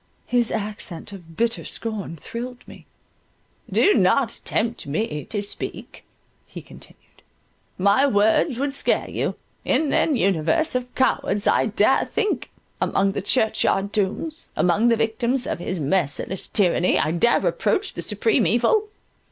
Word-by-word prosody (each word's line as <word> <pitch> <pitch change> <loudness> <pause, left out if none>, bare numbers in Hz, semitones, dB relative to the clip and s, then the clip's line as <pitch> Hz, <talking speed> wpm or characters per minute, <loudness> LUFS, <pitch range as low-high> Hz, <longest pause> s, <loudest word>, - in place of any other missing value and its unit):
His 240 -2 +1
accent 205 -3 -4
of 170 -5 -12
bitter 230 0 0
scorn 215 -7 -4
thrilled 240 - -8
me—"Do 410 - -3
not 230 +4 +2
tempt 230 -5 -1
me 150 0 -2
to 205 -2 -3
speak," 200 - -6 0.4
he - - -10
continued, - - -17 0.6
"my 200 +9 +4
words 220 +4 +2
would 275 +1 -1
scare - - 0
you—in 305 -3 -2
an 305 - +2
universe 200 - +1
of 250 0 -4
cowards 205 -5 +1
I - - +3
dare 215 +4 +2
think—among 410 - -2
the 195 - -3
church 220 +2 +1
yard 200 +1 0
tombs—among 215 - 0
the 230 -1 +3
victims 235 +3 0
of - - -3
His 180 +1 -3
merciless 165 +4 -1
tyranny 180 -3 +2
I 155 - +1
dare 205 +8 +3
reproach - - 0
the - - -5
Supreme 450 - +1
Evil. 430 -2 +2
220 Hz, 130 wpm, -23 LUFS, 190-250 Hz, 0.6 s, my